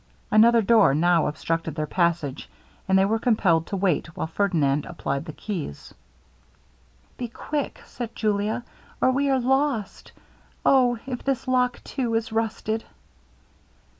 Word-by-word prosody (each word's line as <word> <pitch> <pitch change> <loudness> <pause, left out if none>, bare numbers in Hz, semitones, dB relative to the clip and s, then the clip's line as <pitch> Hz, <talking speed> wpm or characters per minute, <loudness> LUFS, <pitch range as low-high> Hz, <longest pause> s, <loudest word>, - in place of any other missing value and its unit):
Another 230 +1 +6
door 220 -10 +5
now 170 +1 +3
obstructed 160 +1 -2
their 155 -1 -1
passage; 170 -5 -1 0.4
and 190 -1 +4
they 190 - +4
were 220 +3 +1
compelled 185 -9 +2
to 200 - -3
wait 175 -4 -1
while - - -1
Ferdinand 160 -5 +1
applied 140 -4 -3
the 160 - -6
keys. 165 - -6 1.2
'Be 245 - -3
quick,' 290 +5 -4
said 235 -2 -7
Julia, 215 +2 -1 0.4
'or 260 - +3
we 280 +2 +1
are 265 -1 +3
lost. 265 -4 -1 0.5
O! 250 -3 +4
if 255 -2 -5
this 270 -1 -1
lock 250 -1 +1
too 245 -4 -2
is 225 0 -1
rusted!' 220 0 -2
215 Hz, 135 wpm, -24 LUFS, 165-245 Hz, 1.2 s, Another